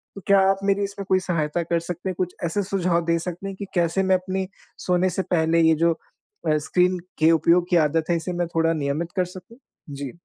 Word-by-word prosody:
तो 195 Hz, -, -8 dB
क्या 200 Hz, 0 st, +6 dB
आप 195 Hz, 0 st, +1 dB
मेरी 200 Hz, 0 st, +2 dB
इसमें 200 Hz, 0 st, -5 dB
कोई 190 Hz, 0 st, +4 dB
सहायता 170 Hz, -3 st, -1 dB
कर 170 Hz, +1 st, 0 dB
सकते 175 Hz, +2 st, -5 dB
हैं? 185 Hz, -, -3 dB
कुछ 180 Hz, -1 st, -2 dB
ऐसे 185 Hz, +4 st, 0 dB
सुझाव 180 Hz, -3 st, 0 dB
दे 170 Hz, 0 st, +2 dB
सकते 180 Hz, +3 st, -5 dB
हैं 195 Hz, -, -5 dB
कि 200 Hz, -, -6 dB
कैसे 175 Hz, +2 st, +1 dB
मैं 190 Hz, 0 st, +3 dB
अपनी 185 Hz, +1 st, -2 dB, 0.4 s
सोने 180 Hz, +1 st, +2 dB
से 190 Hz, -, -1 dB
पहले, 165 Hz, -1 st, +1 dB
ये 160 Hz, 0 st, +5 dB
जो 170 Hz, -, +5 dB, 0.6 s
अ, 155 Hz, 0 st, +3 dB
स्क्रीन 180 Hz, 0 st, +2 dB, 0.2 s
के 160 Hz, +1 st, +5 dB
उपयोग 170 Hz, +2 st, +3 dB
की 180 Hz, -, +2 dB
आदत 160 Hz, +2 st, -1 dB
है, 170 Hz, -, +3 dB
इसे 175 Hz, +2 st, -4 dB
मैं 175 Hz, -1 st, -1 dB
थोड़ा 165 Hz, 0 st, +3 dB
नियमित 155 Hz, +3 st, -2 dB
कर 185 Hz, -1 st, +1 dB
सकूँ? 185 Hz, +6 st, -12 dB, 0.3 s
जी। 140 Hz, -2 st, -6 dB
175 Hz, 230 wpm, -23 LUFS, 165-190 Hz, 0.6 s, क्या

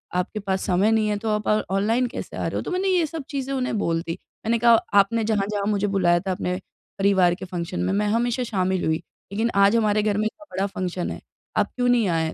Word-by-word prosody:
आपके 180 Hz, +4 st, -1 dB
पास 190 Hz, -2 st, -2 dB
समय 195 Hz, +3 st, +3 dB
नहीं 220 Hz, -1 st, +2 dB
है 210 Hz, -, 0 dB
तो 220 Hz, +2 st, -3 dB
आप 210 Hz, 0 st, -1 dB
अ, 215 Hz, 0 st, +3 dB
ऑनलाइन 225 Hz, +6 st, +2 dB
कैसे 245 Hz, -, -7 dB
आ -, -, -1 dB
रहे -, -, -4 dB
हो -, -, -1 dB
तो -, -, -5 dB
मैंने 370 Hz, +2 st, 0 dB
ये 360 Hz, -3 st, +3 dB
सब 315 Hz, 0 st, -6 dB
चीज़ें 275 Hz, -1 st, -3 dB
उन्हें 255 Hz, -4 st, -1 dB
बोल 165 Hz, -3 st, 0 dB
दी। 165 Hz, 0 st, -4 dB, 0.3 s
मैंने 230 Hz, +1 st, +2 dB
कहा 235 Hz, +1 st, +6 dB, 0.3 s
आपने 220 Hz, +3 st, +2 dB
जहाँ-जहाँ 205 Hz, -1 st, 0 dB
मुझे 205 Hz, -1 st, +1 dB
बुलाया 180 Hz, -3 st, +3 dB
था 190 Hz, -, +1 dB
अपने 180 Hz, 0 st, -2 dB, 0.4 s
परिवार 190 Hz, -3 st, +3 dB
के 190 Hz, -, -8 dB
फ़ंक्शन 170 Hz, -, -4 dB
में -, -, 0 dB
मैं 210 Hz, +1 st, +1 dB
हमेशा 240 Hz, +3 st, +1 dB
शामिल 190 Hz, -5 st, 0 dB
हुई, 160 Hz, 0 st, +2 dB, 0.3 s
लेकिन 225 Hz, +3 st, 0 dB
आज 200 Hz, +2 st, +5 dB
हमारे 215 Hz, -2 st, +2 dB
घर 210 Hz, -1 st, +1 dB
में 215 Hz, -, +1 dB
इतना 310 Hz, +8 st, -5 dB
बड़ा 190 Hz, +1 st, +1 dB
फ़ंक्शन 185 Hz, -2 st, -3 dB
है, -, -, -6 dB, 0.4 s
आप -, -, +1 dB
क्यों 245 Hz, -1 st, +1 dB
नहीं 240 Hz, -4 st, +3 dB
आए? 160 Hz, -2 st, 0 dB
205 Hz, 245 wpm, -24 LUFS, 185-230 Hz, 0.4 s, कहा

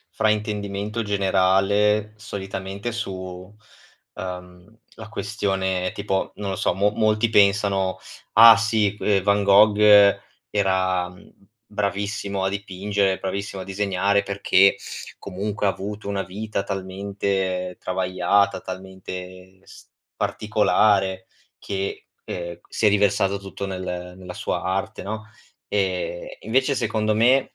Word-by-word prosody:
fraintendimento 105 Hz, +1 st, -1 dB
generale 100 Hz, +1 st, +2 dB
solitamente 100 Hz, +1 st, -5 dB
su, 95 Hz, -3 st, -6 dB, 0.6 s
ehm, 90 Hz, +3 st, -8 dB, 0.2 s
la 110 Hz, -1 st, -10 dB
questione 95 Hz, -3 st, -1 dB
tipo, 100 Hz, -2 st, -2 dB
non 100 Hz, -1 st, -4 dB
lo 95 Hz, -, -3 dB
so, -, -, 0 dB
mo 100 Hz, +2 st, +2 dB
molti 110 Hz, +1 st, +2 dB
pensano: 100 Hz, -2 st, +3 dB, 0.4 s
"Ah 115 Hz, 0 st, +10 dB
sì 110 Hz, -2 st, +1 dB
que 100 Hz, -2 st, +1 dB
Van 100 Hz, +1 st, +2 dB
Gogh 105 Hz, +1 st, +6 dB, 0.7 s
era, 95 Hz, -2 st, +1 dB
mhmm, 90 Hz, +3 st, -17 dB, 0.4 s
bravissimo 100 Hz, -1 st, -2 dB
a -, -, +2 dB
dipingere, 100 Hz, 0 st, -1 dB
bravissimo 95 Hz, 0 st, -4 dB
a -, -, -8 dB
disegnare 100 Hz, 0 st, +1 dB
perché 100 Hz, -1 st, +3 dB, 0.4 s
comunque 100 Hz, +2 st, -3 dB
ha -, -, +4 dB
avuto 100 Hz, +2 st, -6 dB
una 100 Hz, -1 st, -1 dB
vita 105 Hz, +1 st, -4 dB
talmente 95 Hz, -1 st, -3 dB
travagliata, 95 Hz, +2 st, +1 dB
talmente 95 Hz, 0 st, -9 dB
s -, -, -15 dB, 0.3 s
particolare 95 Hz, -3 st, +1 dB, 0.3 s
che, 100 Hz, -1 st, -4 dB, 0.2 s
ehm, 85 Hz, -1 st, -6 dB
si 110 Hz, -, 0 dB
è -, -, +8 dB
riversato 100 Hz, -1 st, +2 dB
tutto 100 Hz, 0 st, -6 dB
nel 90 Hz, -1 st, -5 dB
nella 90 Hz, -1 st, -9 dB
sua -, -, -3 dB
arte, 95 Hz, +1 st, -2 dB
no?" 110 Hz, +2 st, -5 dB, 0.4 s
E 95 Hz, -3 st, -2 dB
e -, -, -15 dB
invece 130 Hz, +4 st, +2 dB
secondo 110 Hz, -3 st, 0 dB
me, 125 Hz, +5 st, +3 dB
100 Hz, 120 wpm, -23 LUFS, 95-105 Hz, 0.7 s, Ah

